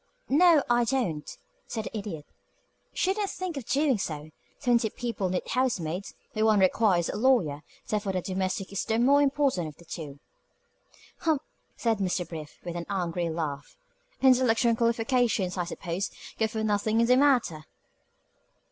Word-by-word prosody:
"No, 320 0 +6
I 240 0 +3
don't," 225 - -1 0.4
said 220 - -3
the - - -7
Idiot. 195 -8 -5 0.7
"Shouldn't 390 +2 0
think 370 -3 -4
of 275 -5 -5
doing 275 -4 +2
so. 155 -3 -5 0.3
Twenty 240 -4 +2
people 230 -5 -3
need 180 0 -2
housemaids, 200 -8 -1 0.2
where 215 - 0
one 215 -2 +4
requires 185 -2 +3
a - - -3
lawyer; 210 - +2 0.3
therefore 205 -2 -1
the 185 - 0
domestic 190 +1 -2
is 200 - -1
the 225 -1 0
more 275 +5 +5
important 275 - +1
of 150 - -10
the 170 - -17
two." 150 -4 -7 1.0
"Humph!" 315 -4 +1 0.3
said 225 -3 0
Mr. 180 -2 -1
Brief, 155 -3 -8
with 175 -1 -5
an 170 0 -5
angry 175 -3 -1
laugh. 150 -3 -4 0.5
"Intellectual 250 -3 +4
qualifications, 230 -4 +1
I 180 -2 -1
suppose, 175 +2 -3 0.3
go 220 - +3
for 220 0 -3
nothing 215 +1 +1
in 235 - +4
the 250 +2 +5
matter." 245 - +2
215 Hz, 155 wpm, -28 LUFS, 175-250 Hz, 1.0 s, No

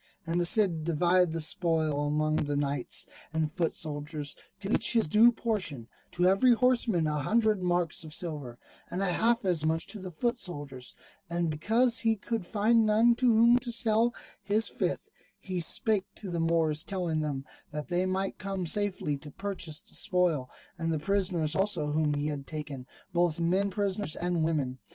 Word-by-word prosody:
And 170 +1 0
the 175 - +3
Cid 175 -6 +2
divided 175 +2 +3
the 165 0 -3
spoil 155 -3 0
among 155 +1 +1
the 145 -1 -1
knights 145 0 -1 0.3
and 160 -1 -1
foot 165 0 -1
soldiers, 150 -1 -5 0.3
to 200 +1 -3
each - - +2
his 225 -7 +3
due 220 +8 +6
portion; 190 - -2 0.3
to 175 - +1
every 195 +7 +5
horseman 235 -8 +2
a 150 -1 0
hundred 215 +3 +2
marks 175 -1 0
of 155 - -10
silver, 150 -7 -4 0.3
and 180 +3 -2
half 225 +5 +1
as 175 -5 +2
much 160 +1 0
to 215 - -7
the 185 -1 -6
foot 235 +9 -1
soldiers: 145 - -5 0.3
and 170 -1 0
because 225 +10 +2
he 225 -1 +2
could 220 -2 -4
find 225 +2 +3
none 220 +2 +4
to 255 - +2
whom 235 +1 +6
to 245 -1 -6
sell 230 0 +2 0.3
his 205 +3 +2
fifth, - - -3 0.3
he 185 -2 -4
spake 200 +3 +3
to 195 -4 -7
the 170 - -2
Moors 165 -2 +1
telling 175 -5 -2
them 140 -3 -3 0.2
that 150 +2 -6
they 180 +1 +1
might 190 +1 -2
come 195 -1 -3
safely 185 -5 0
to 150 - -9
purchase 175 -2 -4
the - - -19
spoil, 170 -8 0 0.3
and 165 0 -1
the 160 - 0
prisoners 175 -2 0
also 190 -7 0
whom 150 -1 +1
he 145 0 -2
had 145 -2 -4
taken, 145 -4 -6 0.3
both 175 -2 +1
men 185 +4 +1
prisoners 200 -3 -2
and 175 -2 -1
women. 140 -5 -1
175 Hz, 180 wpm, -29 LUFS, 155-205 Hz, 0.3 s, due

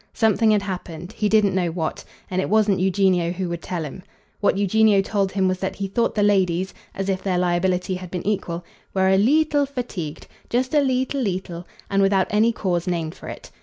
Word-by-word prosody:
Something 220 -1 +3
had 210 -2 +3
happened 180 -2 -6
he 210 -1 -1
didn't 210 -3 +3
know 180 -2 +1
what; 160 -1 -3 0.3
and 185 0 +1
it - - -3
wasn't 210 -2 +3
Eugenio 185 -2 +2
who 180 +1 -3
would 170 -1 -4
tell 175 -3 -4
him. 150 +5 -8 0.4
What 205 - +2
Eugenio 205 +1 +4
told 195 -2 0
him 190 -1 +2
was 185 0 -1
that 190 - -3
he 195 - -3
thought 230 +4 0
the 210 - +2
ladies 190 -2 +2 0.2
as 195 0 -3
if 190 -1 -1
their 185 -2 0
liability 180 +1 +1
had 185 -1 -9
been 180 0 -5
equal 180 -4 -2 0.3
were 190 0 +3
a 190 - +5
"leetle" 290 +5 +3
fatigued, 200 - -5 0.2
just 255 +3 0
a 300 - +5
"leetle 260 +1 0
leetle," 180 -5 -3 0.2
and 195 0 +1
without 195 -1 +3
any 215 +3 +4
cause 180 -5 -2
named 165 -3 -2
for - - -12
it. - - -9
190 Hz, 205 wpm, -22 LUFS, 180-210 Hz, 0.4 s, a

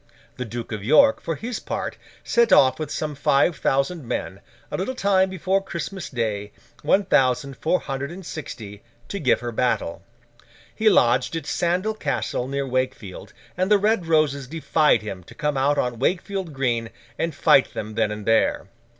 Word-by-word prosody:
The 125 - -3
Duke 115 +1 -6
of 105 -3 -4
York, 275 - +5
for 165 - -3
his 230 - -5
part, - - -4 0.3
set 235 0 +2
off 130 +2 +5
with 155 - -3
some 155 -1 -3
five 140 +3 +2
thousand 140 +6 0
men, 120 - -4 0.3
a - - -2
little 200 +8 -3
time 190 -4 +2
before 190 +1 0
Christmas 190 0 -5
Day, 105 -5 -3 0.3
one 200 0 +2
thousand 135 -4 +2
four 165 +7 +1
hundred 135 0 -4
and 180 +2 -9
sixty, 105 -11 -8 0.3
to 200 - -4
give 130 -8 +2
her 120 -1 -4
battle. 110 -8 -1 0.7
He 220 0 +3
lodged 125 - +3
at 165 - -4
Sandal 180 +5 0
Castle, 130 - -2
near 140 +1 -2
Wakefield, 130 -7 -3 0.2
and 185 +2 0
the 210 - +6
Red 205 -3 +1
Roses 150 -4 +2
defied 155 -5 +2
him 95 -4 -6
to - - -14
come 150 -1 -1
out 140 +2 +2
on 120 -2 -1
Wakefield 185 +4 -1
Green, 120 -4 -1 0.3
and 165 -3 -1
fight 135 - +4
them 110 0 -5
then 110 -1 +1
and 105 -1 -6
there. 110 -3 +2
140 Hz, 175 wpm, -23 LUFS, 120-180 Hz, 0.7 s, the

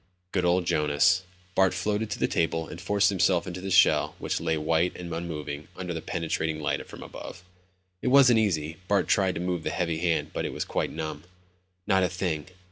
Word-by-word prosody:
Good 90 -2 0
old 90 0 +2
Jonas. 75 +4 +3 0.3
Bart 95 -1 +3
floated 105 +3 -1
to - - -3
the - - +1
table 80 -1 0
and 85 - -9
forced 100 +2 +3
himself 90 -2 +2
into 90 0 -6
the 95 - -4
shell 90 -1 +4
which - - -2
lay 80 - 0
white 80 +3 +1
and 85 -2 -6
unmoving 75 -3 -5
under 90 -1 -4
the 80 - -4
penetrating 80 -1 -2
light 75 - -1
from - - -10
above. 90 - -9 0.6
It - - -3
wasn't 125 -3 +6
easy, 80 -7 0
Bart 100 -2 +2
tried 95 -2 +2
to 85 - -3
move 90 -1 -1
the - - -2
heavy 85 -3 -1
hand, 85 -1 0
but - - -2
it - - -3
was - - -3
quite - - -1
numb. 80 -1 -5 0.6
"Not 95 -1 +3
a 90 - +2
thing. 90 -4 -2
90 Hz, 205 wpm, -27 LUFS, 80-95 Hz, 0.6 s, wasn't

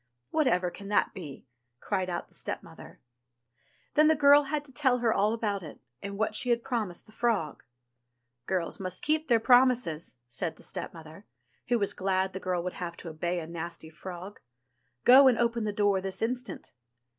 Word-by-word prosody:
'* 120 0 -50
"Whatever 180 - +2
can 200 +2 -10
that 205 - +1
be 150 -10 -9 0.2
?" 120 0 -51
cried 185 +7 -2
out 175 -1 -4
the - - -19
stepmother. - - -6 0.9
Then 305 +1 +5
the 315 - +5
girl 285 0 +6
had 295 +1 -2
to 275 - -11
tell 260 -2 +3
her 235 -2 +2
all 205 +2 +2
about 210 -3 -1
it, 155 -4 -10 0.2
and 200 0 -6
what 215 0 0
she 245 +3 0
had 235 -1 +2
promised 215 -8 -3
the - - -18
frog. 215 -10 -1 0.9
"Girls 180 -3 -2
must 185 -1 -5
keep 310 +1 +1
their 235 -3 +4
promises," 245 - +3
said 145 +7 -3
the - - -14
stepmother, 160 +3 -7 0.4
who 240 - +2
was 200 -3 +1
glad 190 0 0
the 190 - -4
girl 180 -2 -2
would 180 - -3
have 170 -1 -5
to 170 - -8
obey 170 +3 -2
a 165 - -6
nasty 165 -1 -6
frog. 185 +4 -9 0.7
"Go 265 +2 +9
and 250 -3 +4
open 235 -1 0
the 210 - 0
door 205 -2 +2
this 195 +2 -2
instant." 245 - -3
200 Hz, 190 wpm, -29 LUFS, 175-240 Hz, 0.9 s, Go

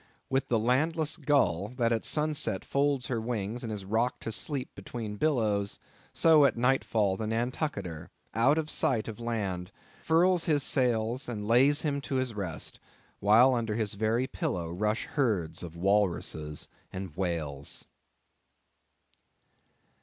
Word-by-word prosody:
With 135 0 +1
the 120 - +2
landless 150 +7 +1
gull, 100 - +2
that 120 -2 +2
at 115 - -1
sunset 150 0 0
folds 140 -2 +1
her 115 -2 -2
wings 115 0 -3
and 115 - -4
is 100 -3 -5
rocked 115 +5 0
to 115 - -3
sleep 135 +4 -3
between 110 -4 -6
billows; 105 -8 +1 0.3
so 160 -3 +5
at 135 -5 +3
nightfall, 115 -6 +2
the 110 - -3
Nantucketer, 115 - -3 0.2
out 130 +8 +4
of 155 -1 -2
sight 115 -5 +1
of 115 0 -6
land, 100 -6 -3 0.3
furls 175 +2 +3
his 145 -4 +2
sails, 120 -1 0
and 105 -3 -4
lays 135 +6 +5
him 140 -2 0
to 135 - -4
his 130 -2 0
rest, 95 -6 -5 0.4
while 115 +6 +6
under 115 -3 -1
his 110 -3 -1
very 110 +4 +1
pillow 90 -6 -3
rush 105 +6 -1
herds 105 - -1
of 85 -2 -7
walruses 85 -5 0 0.2
and 95 -4 -6
whales. 80 -6 -3
115 Hz, 140 wpm, -29 LUFS, 100-135 Hz, 0.4 s, while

